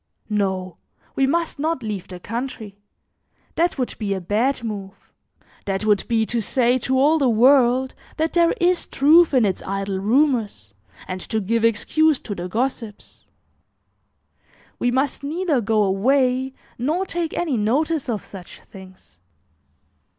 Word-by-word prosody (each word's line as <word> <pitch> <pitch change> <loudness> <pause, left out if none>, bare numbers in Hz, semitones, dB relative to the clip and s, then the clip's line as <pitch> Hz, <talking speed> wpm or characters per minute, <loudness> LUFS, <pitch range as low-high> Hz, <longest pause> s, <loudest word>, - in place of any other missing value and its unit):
No, 190 -3 -1 0.4
we 270 - +2
must 335 +1 -1
not 310 -3 -1
leave 210 -4 -5
the 180 -1 -9
country; 220 -2 -6 0.7
that 340 0 0
would 255 -2 -2
be 200 -3 -1
a - - -3
bad 225 +8 0
move; 200 -3 -7 0.5
that 195 +1 -2
would 210 -2 +2
be 225 -2 +1
to 235 +1 -2
say 250 +3 +2
to 260 +2 0
all 300 +4 +4
the 270 -3 +3
world 255 +2 +4 0.2
that 320 +1 -1
there 340 -1 +4
is 355 0 +1
truth 320 +5 +5
in 255 -5 +3
its 190 -3 -1
idle 195 0 -3
rumors, 220 - 0 0.3
and 185 0 -5
to 220 - -2
give 225 +3 -1
excuse 295 +7 +2
to 205 - -5
the 180 -1 -6
gossips. 230 -1 -4 1.5
We 245 - +1
must 265 +3 0
neither 305 -1 -1
go 215 0 +2
away 255 +6 +1 0.2
nor 315 +10 0
take 340 -3 -3
any 320 -6 0
notice 270 +7 0
of 215 -5 -3
such 185 -3 -11
things." 185 - -15
240 Hz, 145 wpm, -22 LUFS, 205-280 Hz, 1.5 s, truth